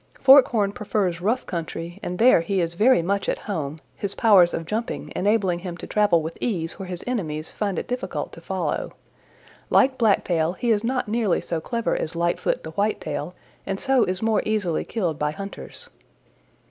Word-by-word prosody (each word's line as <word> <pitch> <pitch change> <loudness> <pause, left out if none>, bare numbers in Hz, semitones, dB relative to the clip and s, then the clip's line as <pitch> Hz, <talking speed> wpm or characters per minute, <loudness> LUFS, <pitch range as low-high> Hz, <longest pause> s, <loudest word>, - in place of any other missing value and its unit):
Forkhorn 255 -7 +6
prefers 195 -4 -1
rough 225 +7 0
country 170 +1 -5
and 180 - -4
there 230 -5 +6
he 195 +3 -1
is 170 -1 0
very 215 +1 +4
much 200 +3 -1
at - - 0
home, 155 -8 -4 0.2
his 200 -1 -4
powers 190 -6 +6
of 165 - -4
jumping 220 +6 -4
enabling 195 -3 +1
him 175 -1 -6
to - - -8
travel 205 -6 +2
with 160 +1 -6
ease 175 -7 -2
where 190 - -6
his 180 -1 -5
enemies 160 -11 -3
find 200 -4 -2
it - - -3
difficult 250 +1 -4
to - - -11
follow. - - -3 0.8
Like 265 0 +3
Blacktail 175 -7 +2
he 235 +5 -1
is 210 -1 +2
not 255 +1 -1
nearly 215 -4 +1
so 165 -2 -3
clever 230 +6 -1
as 165 - -3
Lightfoot 170 +1 0
the 160 - -7
White 205 +6 0
tail 170 +5 -5 0.3
and 195 0 -3
so 265 -3 +3
is 185 +3 -2
more 220 -1 +2
easily 205 -7 0
killed 175 -9 -2
by 150 - +1
hunters. 195 +6 -8
195 Hz, 185 wpm, -24 LUFS, 170-220 Hz, 0.8 s, Forkhorn